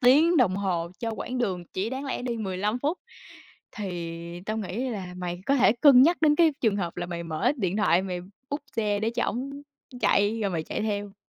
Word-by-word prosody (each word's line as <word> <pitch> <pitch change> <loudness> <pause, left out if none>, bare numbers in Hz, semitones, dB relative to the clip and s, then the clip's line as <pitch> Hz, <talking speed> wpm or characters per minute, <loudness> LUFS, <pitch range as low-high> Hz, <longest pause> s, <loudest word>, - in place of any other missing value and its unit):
tiếng 300 +7 +5
đồng 200 -8 +3
hồ 175 -4 -1
cho 230 - -2
quãng 250 +3 -4
đường 185 -7 -1
chỉ 200 +5 -1
đáng 265 +2 -4
lẽ 270 - -3
đi 240 -2 -2
15 205 +3 -1
phút. 300 +7 -1 0.8
Thì 170 -3 -5
tao 215 +1 -2
nghĩ 220 +6 -3
là 185 -4 -5
mày 175 0 -4
có 275 - +3
thể 235 - +5
cân 265 -4 +8
nhắc 340 +4 +5
đến 300 -1 +5
cái 330 -3 +5
trường 220 -4 +2
hợp 175 -4 -3
là 175 - -3
mày 170 -1 -4
mở 160 - +1
điện 190 -4 -1
thoại, 190 -4 +3
mày 180 -2 -4 0.3
book 285 0 -3
xe 210 -2 +1
để 220 +1 0
cho 240 +1 -1
ổng 275 +4 -4 0.4
chạy 210 +1 +2
rồi 200 - 0
mày 165 -3 -2
chạy - - -3
theo. 205 -2 -3
210 Hz, 220 wpm, -26 LUFS, 180-250 Hz, 0.8 s, cân